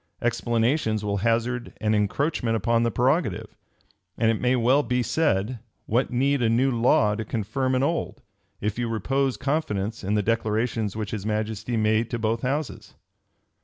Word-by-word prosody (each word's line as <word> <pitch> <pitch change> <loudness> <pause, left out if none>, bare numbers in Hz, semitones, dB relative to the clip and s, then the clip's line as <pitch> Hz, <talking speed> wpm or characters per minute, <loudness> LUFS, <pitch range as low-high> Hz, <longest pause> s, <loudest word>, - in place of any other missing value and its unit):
Explanations 115 -1 0
will 100 -1 0
hazard 120 +3 -1
an 110 0 +1
encroachment 115 +3 0
upon 115 +2 +1
the 115 - +2
prerogative; 125 - 0 0.6
and 115 0 +3
it 110 - -2
may 125 +1 +3
well 125 +4 +3
be 125 -1 0
said, 120 -4 0 0.3
What 120 +5 +1
need 135 +2 +1
a 115 - +3
new 125 +4 +2
law 115 -3 +3
to 110 +2 -3
confirm 115 +5 -1
an 130 - +1
old, 165 +3 -1 0.4
if 105 +3 -2
you 120 -1 -1
repose 135 +5 0
confidence 115 -8 -2
in 100 +3 0
the 105 - +1
declarations 110 -1 0
which 110 -2 -4
his 105 -3 -4
majesty 110 +2 -2
made 110 +1 +2
to 120 - -2
both 115 0 -1
houses?" 140 +2 -3
115 Hz, 165 wpm, -25 LUFS, 110-125 Hz, 0.6 s, and